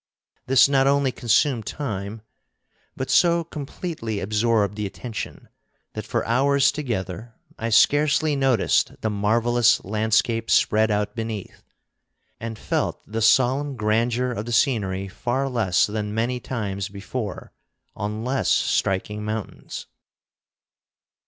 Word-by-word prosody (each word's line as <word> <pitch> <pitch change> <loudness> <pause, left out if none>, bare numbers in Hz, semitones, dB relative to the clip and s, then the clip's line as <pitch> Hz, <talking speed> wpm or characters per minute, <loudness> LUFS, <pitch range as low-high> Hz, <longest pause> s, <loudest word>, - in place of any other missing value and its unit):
This 135 +1 +6
not 135 -1 +3
only 140 -1 +2
consumed 120 0 +1
time, 105 -6 -5 0.7
but 130 - -3
so 170 -1 +4
completely 145 - -5
absorbed 105 0 +1
the 105 -1 -2
attention 110 +2 -7 0.5
that - - -6
for - - -1
hours 135 +4 +3
together 115 -5 -4 0.2
I 115 - -2
scarcely 145 +5 +3
noticed 135 -6 +1
the 110 - -1
marvelous 115 +3 +2
landscape 110 +2 +1
spread 110 +1 +3
out 105 +2 -1
beneath, 110 -4 -5 0.8
and 115 -1 -5
felt - - -2
the 110 +1 -4
solemn 130 +5 +3
grandeur 115 +3 0
of 110 -1 -5
the 120 - -3
scenery 100 -7 +1
far 125 +7 -2
less 115 -8 +2
than 105 0 -4
many 120 +3 0
times 100 -6 -4
before 100 +1 -6 0.4
on 105 +1 -4
less 130 +1 0
striking 105 +2 0
mountains. 110 0 -5
115 Hz, 120 wpm, -23 LUFS, 105-130 Hz, 0.8 s, This